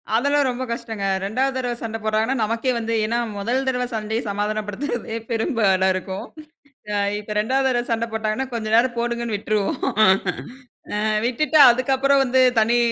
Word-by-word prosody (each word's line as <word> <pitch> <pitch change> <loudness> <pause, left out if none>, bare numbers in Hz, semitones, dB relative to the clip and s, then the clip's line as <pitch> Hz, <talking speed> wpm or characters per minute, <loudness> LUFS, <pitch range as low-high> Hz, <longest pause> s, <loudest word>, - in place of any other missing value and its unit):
அதெல்லாம் 285 +3 +2
ரொம்ப 250 +1 -3
கஷ்டங்க 225 -4 -4 0.2
2வது 260 +6 -1
தடவ 245 -2 -2
சண்டை 225 -1 -4
போடுறாங்கன்னா 220 +4 0
நமக்கே 230 +4 0
வந்து 230 0 -2
ஏன்னா 235 +2 -1 0.2
முதல் 245 +6 -1
தடவை 250 -1 0
சண்டையை 220 +2 -2
சமாதானப்படுத்துறதே 215 +4 -3
பெரும் 230 +6 -1
பாடா 190 -3 +3
இருக்கும். 190 +1 -5 0.7
அ - - -2 0.2
இப்ப 210 0 -6
2வது 265 +5 +1
தடவை 240 -1 0
சண்டை 230 0 0
போட்டாங்கன்னா 220 +4 -2
கொஞ்ச 220 -2 -3
நேரம் 240 +1 +3
போடுங்கன்னு 235 -2 -2
விட்டுருவோம். 205 0 -1 1.2
அ - - -1 0.2
விட்டுட்டு 305 +6 +1
அதுக்கப்புறம் 270 +3 +2
வந்து, 260 0 +2 0.2
தனி 235 +2 +3
235 Hz, 150 wpm, -22 LUFS, 215-255 Hz, 1.2 s, பாடா